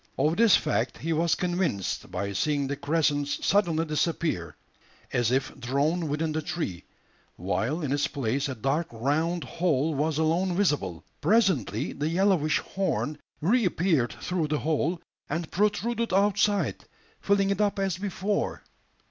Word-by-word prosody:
Of 155 +2 +2
this 230 -3 +6
fact 150 - 0
he 165 +2 -2
was 165 +1 +2
convinced 175 - -1
by 100 +2 -3
seeing 145 +7 0
the 140 +1 -2
crescent 145 0 +1
suddenly 165 +1 +1
disappear 155 - -1 0.6
as 120 -2 +2
if 130 +2 0
drawn 145 +7 0
within 155 +2 -1
the 155 +1 -1
tree, 155 - -4 0.5
while 100 - -1
in 140 - -2
its 145 0 +1
place 140 +1 -1
a 130 - -3
dark 135 +8 0
round 155 +9 0
hole 160 -3 0
was 150 +2 0
alone 170 +3 +1
visible. 145 - 0 0.2
Presently 145 - +2
the 150 +2 -2
yellowish 175 -3 +2
horn 185 -6 -2 0.2
reappeared 175 - +2
through 175 -4 -2
the 150 0 0
hole, 160 +3 0 0.3
and 165 +2 -3
protruded 225 +4 0
outside, 205 +1 +2 0.3
filling 200 -1 +2
it 200 - 0
up 205 -1 +1
as 195 -3 -1
before! 200 +1 -2
160 Hz, 140 wpm, -27 LUFS, 140-185 Hz, 0.6 s, this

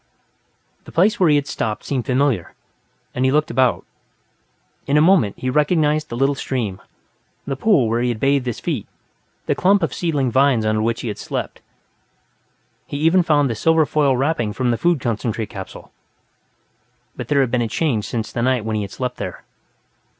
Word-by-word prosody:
The - - -12
place 195 +6 +2
where 180 -4 +4
he 145 -1 +5
stopped 110 -6 -3
seemed 130 -4 -3
familiar, 130 -8 0 0.6
and 125 - -1
he 130 - +3
looked 150 +2 +1
about. 120 -6 +1 1.0
In 145 - +2
a - - +6
moment, 155 - +3
he 130 - -5
recognized 150 +2 +1
the 120 - -5
little 135 +2 +2
stream, 115 -8 -3 0.6
the 135 - -3
pool 145 - +3
where 115 +2 0
he 125 - +1
had 115 -3 -3
bathed 135 -1 +1
his 120 - -3
feet, 145 - -3 0.6
the - - +1
clump 195 +2 +3
of - - -1
seedling 145 -7 -1
pines 130 -3 +3
under 110 0 +1
which 115 +1 -1
he - - -5
had 105 - -6
slept. - - -5 1.3
He 145 - -5
even 165 +5 +4
found 150 -4 +2
the 120 - -2
silver 160 +7 +3
foil 140 -4 +1
wrapping 130 -6 0
from 125 +1 0
the 115 - 0
food 175 -3 +2
concentrate 115 -2 -2
capsule. 95 -1 -9 1.2
But - - -6
there 140 -2 +3
had 130 -3 0
been 125 -1 +1
a 115 - 0
change, 115 -5 -1
since 110 -2 -4
the 120 - -3
night 125 -2 +1
when 110 -1 -2
he - - -1
had 100 - -5
slept 125 +4 -5
here. - - -6
130 Hz, 185 wpm, -20 LUFS, 115-150 Hz, 1.3 s, a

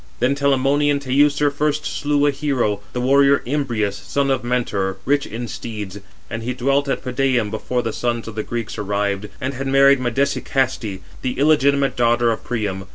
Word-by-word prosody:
Then 125 +3 +2
Telamonian 140 +1 +2
Teucer 145 +2 +2
first 150 +1 -1
slew 145 0 0
a 145 - +4
hero, 135 -8 -1
the 125 - -3
warrior 140 +2 +4
Imbrius, 115 -7 -1
son 140 -1 0
of 135 - 0
Mentor, 105 -6 -1
rich 140 +1 +1
in 120 +2 -5
steeds; 105 -3 -6 0.3
and 115 - -5
he 125 +2 -3
dwelt 140 +3 +1
at - - -1
Pedæum 125 -4 0
before 125 +3 -2
the 115 - -3
sons 120 -2 -2
of 115 - -6
the 110 - -2
Greeks 115 -1 -5
arrived, 100 0 -1
and 130 +2 -3
had 135 +1 -4
married 140 0 +5
Medesicaste, 125 -4 -1 0.2
the 125 - -3
illegitimate 140 -1 +3
daughter 120 0 +3
of 110 - -4
Priam. 100 -5 -3
130 Hz, 170 wpm, -20 LUFS, 115-140 Hz, 0.3 s, married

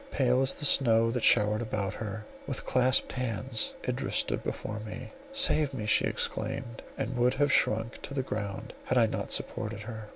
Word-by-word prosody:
Pale 130 - +2
as 135 - +2
the 150 - -2
snow 115 -5 +5
that 125 -1 -2
showered 105 0 +4
about 105 -4 -2
her, 105 0 -6 0.2
with - - -3
clasped 130 0 +3
hands, 120 -6 -2
Idris - - -2
stood - - 0
before 110 0 -4
me. 110 - -8 0.2
"Save 155 - +2
me!" 110 -5 -4
she 105 - +3
exclaimed, 115 -1 -3 0.2
and 125 +3 -3
would 125 +1 +2
have 145 -1 +2
sunk 115 0 +1
to 140 - -7
the 135 - 0
ground 105 -5 -5
had - - 0
I - - +6
not - - -3
supported 110 -1 -1
her. 110 -1 -8
115 Hz, 185 wpm, -29 LUFS, 110-130 Hz, 0.2 s, I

